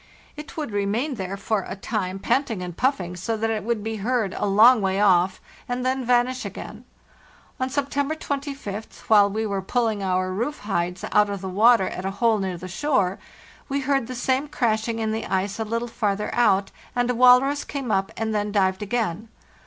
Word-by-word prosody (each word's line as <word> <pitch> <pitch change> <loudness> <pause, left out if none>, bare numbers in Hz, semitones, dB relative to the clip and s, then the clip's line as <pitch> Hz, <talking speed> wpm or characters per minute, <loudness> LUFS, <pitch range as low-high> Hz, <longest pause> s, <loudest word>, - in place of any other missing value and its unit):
It 300 +1 -10
would 300 -7 -3
remain 205 +8 -1
there 195 -3 -4
for 200 0 -1
a - - -5
time 195 -2 -3
panting 225 -2 0
and 175 -2 -6
puffing 190 -9 0
so 220 +6 -2
that 225 +1 0
it 215 -1 -2
would 225 -1 -1
be 220 0 -3
heard 220 -2 0
a - - -1
long 220 +4 +6
way 190 0 0
off, 185 -2 +3 0.3
and 250 +1 -2
then 260 0 0
vanish 250 +1 +2
again. - - -8 0.7
On 260 0 -1
September 285 +2 -1
25th, 275 -8 -5
while 205 -2 +6
we 220 +2 -2
were 200 -2 -2
pulling 220 +1 0
our 185 -1 0
roof 240 +10 -3
hides 180 -3 -2
out 210 0 +4
of 200 -2 -4
the 190 - -4
water 210 +1 +5
at 185 - -5
a 190 - -1
hole 225 -1 +3
near 190 -2 -2
the 185 +2 -8
shore, 195 -3 0 0.5
we 280 +1 -1
heard 270 -3 0
the 255 - -6
same 260 +3 0
crashing 230 -4 0
in 220 -1 -1
the 220 +1 -3
ice 195 +2 -1
a - - 0
little 230 +2 -2
farther 210 -3 -2
out, 200 -5 +3 0.2
and 245 0 +1
a - - 0
walrus 250 +4 +5
came 270 -5 -4
up 195 -1 0
and 220 0 -1
then 210 0 -1
dived 190 -1 +1
again. 220 -2 -2
220 Hz, 200 wpm, -24 LUFS, 195-250 Hz, 0.7 s, long